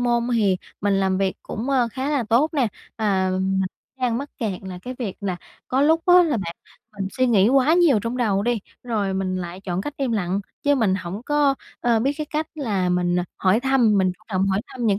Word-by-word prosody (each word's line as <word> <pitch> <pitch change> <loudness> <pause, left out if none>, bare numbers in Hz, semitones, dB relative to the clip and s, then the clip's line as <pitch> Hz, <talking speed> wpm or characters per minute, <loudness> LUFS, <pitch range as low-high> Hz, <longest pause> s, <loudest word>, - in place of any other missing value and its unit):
môn 240 -1 +1
hì 210 -6 +2 0.2
mình 200 0 +2
làm 190 -1 +1
việc 195 -1 0
cũng, 235 +6 -4
ơ, 250 -3 +2
khá 265 +2 -3
là 285 -4 +1
tốt 240 +8 +3
nè. 260 -7 +2 0.3
À, 195 -4 +1
mình 190 +1 0 0.4
đang 240 -2 +1
mắc 285 +1 -6
kẹt 205 -6 -3
là 185 -1 -7
cái 255 - -6
việc 215 -7 -4
là 190 -3 -2 0.3
có 260 +2 +1
lúc 320 +3 +4
á 355 - +7
là 315 -8 +1
bản 170 -4 -4 0.4
mình 195 - -2
suy 255 -1 +2
nghĩ 215 -3 +4
quá 275 +3 +4
nhiều 335 -10 +5
trong 230 +2 -3
đầu 205 -5 +1
đi, 240 0 +1 0.2
rồi 210 -5 -1
mình 185 -1 -1
lại 175 0 -6
chọn 185 -2 -3
cách 295 +7 -5
im 265 -4 -1
lặng 195 -2 0 0.2
chứ 285 0 +3
mình 220 -7 +2
hổng 190 +2 -5
có, 295 -2 +3 0.3
ơ, 235 -2 +3
biết 275 +5 +1
cái 305 - -3
cách 310 0 -1
là 210 - -1
mình 180 0 +1 0.2
hỏi 190 +4 +2
thăm, 245 -6 +3
mình 185 -1 +2
chủ 200 - -22
động 190 -2 +1
hỏi 195 0 +1
thăm 245 -3 -4
những 200 -1 +2
220 Hz, 230 wpm, -23 LUFS, 190-255 Hz, 0.4 s, á